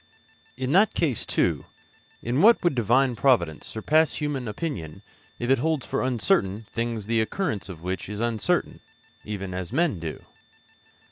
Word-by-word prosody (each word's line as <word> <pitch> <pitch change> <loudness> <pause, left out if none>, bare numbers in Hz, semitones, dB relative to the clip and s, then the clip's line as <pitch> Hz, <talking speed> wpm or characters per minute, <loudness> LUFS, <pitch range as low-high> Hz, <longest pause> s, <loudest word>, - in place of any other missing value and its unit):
In 130 0 -2
that 195 +6 +4
case, 140 -9 0
too, - - +1 0.6
in 120 +4 0
what 225 +2 +6
would 175 - +3
Divine 120 +2 +2
providence 105 - +2
surpass 155 +8 +2
human 145 -5 -2
opinion 105 - -5 0.3
if 120 +2 -1
it 135 - +4
holds 155 0 0
for - - -2
uncertain 120 - +1
things 115 -2 -2
the 115 +1 +1
occurrence 110 - -2
of 85 -3 -9
which 90 0 -4
is 105 0 -5
uncertain, 115 -2 0 0.5
even 95 -3 -5
as 90 +1 -5
men 145 - +1
do? 80 -2 -6
120 Hz, 150 wpm, -25 LUFS, 100-145 Hz, 0.6 s, what